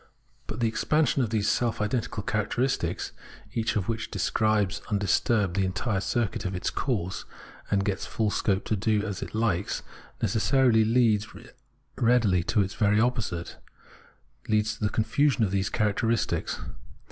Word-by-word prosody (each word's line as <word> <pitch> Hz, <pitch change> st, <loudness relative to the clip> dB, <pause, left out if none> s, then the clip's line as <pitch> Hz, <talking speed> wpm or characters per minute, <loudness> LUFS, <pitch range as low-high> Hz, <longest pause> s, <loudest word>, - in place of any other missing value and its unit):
But 110 Hz, -, -5 dB
the 115 Hz, -, +3 dB
.expansion 140 Hz, +6 st, +1 dB
of 120 Hz, -, 0 dB
these 105 Hz, -2 st, 0 dB
self 120 Hz, 0 st, +1 dB
identical 110 Hz, 0 st, -2 dB
characteristics, 110 Hz, +5 st, -1 dB, 0.4 s
each 115 Hz, -1 st, 0 dB
of 100 Hz, -3 st, -1 dB
which 115 Hz, -1 st, -2 dB
describes 105 Hz, -2 st, +1 dB
undisturbed 100 Hz, -1 st, +1 dB
the 100 Hz, -, +2 dB
entire 95 Hz, +2 st, -1 dB
circuit 115 Hz, 0 st, -1 dB
of 95 Hz, +1 st, -3 dB
its 90 Hz, -, -2 dB
course, 95 Hz, -9 st, -2 dB, 0.5 s
and 100 Hz, -1 st, +1 dB
gets 100 Hz, -1 st, -2 dB
full 110 Hz, -2 st, 0 dB
scope 95 Hz, -1 st, 0 dB
to 110 Hz, -, 0 dB
do 105 Hz, +1 st, +1 dB
as 100 Hz, -4 st, -4 dB
it -, -, -6 dB
likes, 105 Hz, -4 st, 0 dB, 0.4 s
necessarily 120 Hz, -1 st, +3 dB
leads 110 Hz, -2 st, +3 dB
as 115 Hz, +5 st, -12 dB, 0.5 s
readily 115 Hz, -7 st, +3 dB
to 105 Hz, -, +2 dB
its 95 Hz, -, -5 dB
very 105 Hz, -1 st, +2 dB
opposite, 110 Hz, -8 st, -1 dB, 0.9 s
leads 110 Hz, 0 st, +2 dB
to 105 Hz, -, -8 dB
the 105 Hz, -, +2 dB
confusion 130 Hz, +4 st, +2 dB
of 100 Hz, -, +1 dB
these 95 Hz, 0 st, 0 dB
characteristics. 110 Hz, +1 st, 0 dB
110 Hz, 150 wpm, -27 LUFS, 100-115 Hz, 0.9 s, the